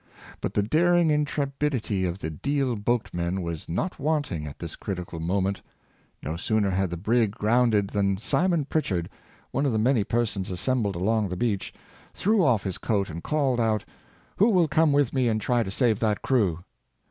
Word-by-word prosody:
But -, -, -3 dB
the 105 Hz, -, +3 dB
daring 170 Hz, +7 st, +3 dB
intrepidity 140 Hz, -8 st, -1 dB
of 90 Hz, 0 st, -2 dB
the 80 Hz, -5 st, -5 dB
Deal 135 Hz, -, -1 dB
boatmen 95 Hz, -5 st, -1 dB
was 85 Hz, -2 st, -5 dB
not 175 Hz, -, -2 dB
wanting 140 Hz, -, -1 dB
at 70 Hz, -, -9 dB
this 85 Hz, -2 st, -7 dB
critical 90 Hz, -3 st, -5 dB
moment. 95 Hz, +3 st, -1 dB, 0.6 s
No 80 Hz, +4 st, -3 dB
sooner 105 Hz, +2 st, +1 dB
had 95 Hz, 0 st, 0 dB
the 85 Hz, -, -4 dB
brig 110 Hz, +4 st, +2 dB
grounded 110 Hz, -2 st, +2 dB
than 100 Hz, -2 st, +1 dB
Simon 170 Hz, -, +1 dB
Pritchard, 95 Hz, -, -1 dB, 0.4 s
one 140 Hz, -, 0 dB
of 130 Hz, -, 0 dB
the -, -, +1 dB
many 115 Hz, 0 st, +3 dB
persons 110 Hz, -3 st, -1 dB
assembled 100 Hz, +2 st, 0 dB
along 105 Hz, +3 st, +1 dB
the 90 Hz, -, -4 dB
beach, 105 Hz, -3 st, -1 dB, 0.4 s
threw 210 Hz, -1 st, +2 dB
off 120 Hz, -9 st, +3 dB
his 95 Hz, -3 st, -4 dB
coat 100 Hz, -6 st, 0 dB
and 85 Hz, +2 st, -6 dB
called 140 Hz, -, 0 dB
out, 110 Hz, -3 st, +1 dB, 0.3 s
'' -, -, -32 dB
Who 210 Hz, +5 st, +5 dB
will 180 Hz, -6 st, +4 dB
come 155 Hz, 0 st, +3 dB
with 140 Hz, -3 st, +2 dB
me 130 Hz, -2 st, +2 dB
and 110 Hz, -1 st, +1 dB
try 120 Hz, +3 st, +1 dB
to 110 Hz, -, -3 dB
save 110 Hz, +1 st, +1 dB
that 105 Hz, -2 st, 0 dB
crew?" 95 Hz, -10 st, +1 dB
110 Hz, 180 wpm, -26 LUFS, 95-135 Hz, 0.6 s, Who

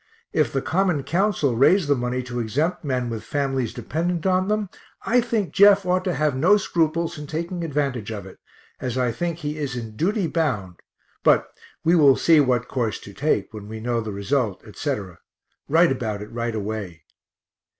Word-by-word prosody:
If -, -, +2 dB
the 135 Hz, -, -1 dB
Common 180 Hz, -5 st, +1 dB
Council 170 Hz, -, +1 dB
raise 170 Hz, -, +4 dB
the 145 Hz, -, +4 dB
money 125 Hz, -1 st, -2 dB
to 125 Hz, -1 st, -5 dB
exempt 145 Hz, +12 st, -1 dB
men 130 Hz, -4 st, -1 dB
with 110 Hz, -2 st, -5 dB
families 135 Hz, -1 st, -1 dB
dependent 165 Hz, -, -2 dB
on 185 Hz, 0 st, +2 dB
them, 210 Hz, -1 st, 0 dB, 0.4 s
I 245 Hz, +1 st, +3 dB
think 225 Hz, -5 st, -2 dB
Jeff 200 Hz, -1 st, +6 dB
ought 180 Hz, +1 st, +1 dB
to 180 Hz, -, 0 dB
have 150 Hz, -3 st, +1 dB
no 180 Hz, +10 st, +5 dB
scruples 170 Hz, -3 st, 0 dB
in 150 Hz, -, -7 dB
taking 170 Hz, +3 st, -4 dB
advantage 140 Hz, -8 st, -2 dB
of 100 Hz, -3 st, -6 dB
it, 95 Hz, -, -13 dB, 0.4 s
as 125 Hz, -1 st, -3 dB
I 125 Hz, -2 st, +1 dB
think 170 Hz, +7 st, -3 dB
he 150 Hz, -2 st, -4 dB
is 140 Hz, -4 st, -3 dB
in 115 Hz, -3 st, -6 dB
duty 195 Hz, -, 0 dB
bound 120 Hz, -, -1 dB, 0.4 s
but -, -, +3 dB, 0.3 s
we 165 Hz, -, +3 dB
will 145 Hz, -5 st, +6 dB
see 160 Hz, +2 st, +5 dB
what 125 Hz, -3 st, +2 dB
course 115 Hz, -5 st, -2 dB
to 100 Hz, -, -11 dB
take, 145 Hz, -1 st, 0 dB
when 105 Hz, -2 st, -8 dB
we 110 Hz, +1 st, -7 dB
know 120 Hz, +1 st, -1 dB
the 110 Hz, -1 st, -5 dB
result, 100 Hz, +1 st, -1 dB
etc.; 105 Hz, -, -4 dB, 0.5 s
write 165 Hz, +2 st, +5 dB
about 110 Hz, -6 st, -3 dB
it 105 Hz, -, -12 dB
right 115 Hz, -1 st, -3 dB
away. 100 Hz, -6 st, -5 dB
140 Hz, 185 wpm, -23 LUFS, 115-170 Hz, 0.5 s, Jeff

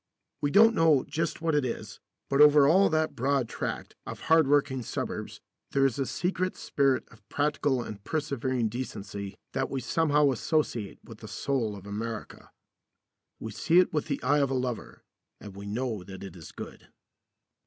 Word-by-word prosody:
We 145 Hz, -, +1 dB
don't 225 Hz, +8 st, +6 dB
know 160 Hz, -, +4 dB
just 160 Hz, +3 st, -2 dB
what 165 Hz, -1 st, 0 dB
it 150 Hz, -1 st, +2 dB
is, 125 Hz, -, -5 dB, 0.3 s
but 140 Hz, +1 st, +3 dB
over 150 Hz, -1 st, +8 dB
all 190 Hz, +6 st, +5 dB
that 155 Hz, 0 st, +1 dB
broad 135 Hz, 0 st, +1 dB
tract -, -, -5 dB
of -, -, -7 dB
hardworking 145 Hz, -4 st, +3 dB
suburbs 115 Hz, -, -5 dB, 0.3 s
there 135 Hz, 0 st, +4 dB
is 135 Hz, -1 st, 0 dB
a 135 Hz, -, 0 dB
secret 185 Hz, +1 st, -1 dB
spirit 135 Hz, -2 st, +1 dB
of 110 Hz, -1 st, -20 dB
practical 145 Hz, -3 st, 0 dB
and 100 Hz, -3 st, -8 dB
persevering 130 Hz, -5 st, -1 dB
decency 100 Hz, -4 st, -6 dB, 0.2 s
that 135 Hz, 0 st, -1 dB
we 135 Hz, -, -2 dB
somehow 150 Hz, +2 st, +2 dB
associate 120 Hz, -6 st, -1 dB
with 115 Hz, -2 st, -12 dB
the 110 Hz, -, -9 dB
soul 115 Hz, 0 st, -1 dB
of 100 Hz, -1 st, -11 dB
America. 110 Hz, +2 st, -6 dB, 0.9 s
We 110 Hz, -, -6 dB
see 160 Hz, +10 st, +2 dB
it 180 Hz, -, +5 dB
with 150 Hz, -, -1 dB
the 140 Hz, -2 st, -2 dB
eye 145 Hz, +1 st, +3 dB
of 140 Hz, -2 st, +2 dB
a 135 Hz, -, -1 dB
lover, 125 Hz, -4 st, -4 dB, 0.4 s
and 100 Hz, -2 st, -10 dB
we 100 Hz, +1 st, -8 dB
know 110 Hz, -2 st, -3 dB
that 95 Hz, +1 st, -10 dB
it 95 Hz, -2 st, -9 dB
is 85 Hz, -3 st, -11 dB
good. -, -, -10 dB
135 Hz, 175 wpm, -28 LUFS, 110-150 Hz, 0.9 s, over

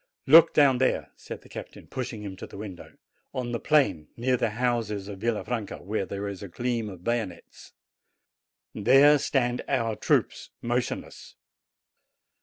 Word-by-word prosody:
"Look 165 Hz, +3 st, +8 dB
down 135 Hz, -4 st, +5 dB
there," 130 Hz, -, 0 dB
said -, -, -9 dB
the -, -, -16 dB
captain, -, -, -9 dB
pushing 115 Hz, -4 st, -5 dB
him 100 Hz, -2 st, -6 dB
to -, -, -8 dB
the -, -, -11 dB
window; 100 Hz, -4 st, -9 dB, 0.4 s
"on 125 Hz, -2 st, -3 dB
the 115 Hz, -, -2 dB
plain, 140 Hz, -, +2 dB
near 125 Hz, +2 st, +1 dB
the 120 Hz, -2 st, 0 dB
houses 115 Hz, -5 st, -1 dB
of 100 Hz, -2 st, -7 dB
Villa 115 Hz, 0 st, -1 dB
franca, 115 Hz, -4 st, -4 dB
where 100 Hz, +1 st, -3 dB
there 100 Hz, +1 st, -4 dB
is 100 Hz, -2 st, -6 dB
a 100 Hz, -, -6 dB
gleam 115 Hz, +3 st, -2 dB
of 90 Hz, -3 st, -11 dB
bayonets. 115 Hz, -6 st, -4 dB, 1.0 s
There 135 Hz, +7 st, +6 dB
stand 125 Hz, -4 st, 0 dB
our 115 Hz, -5 st, 0 dB
troops, -, -, 0 dB
motionless. 120 Hz, +1 st, -3 dB
120 Hz, 155 wpm, -27 LUFS, 100-125 Hz, 1.0 s, Look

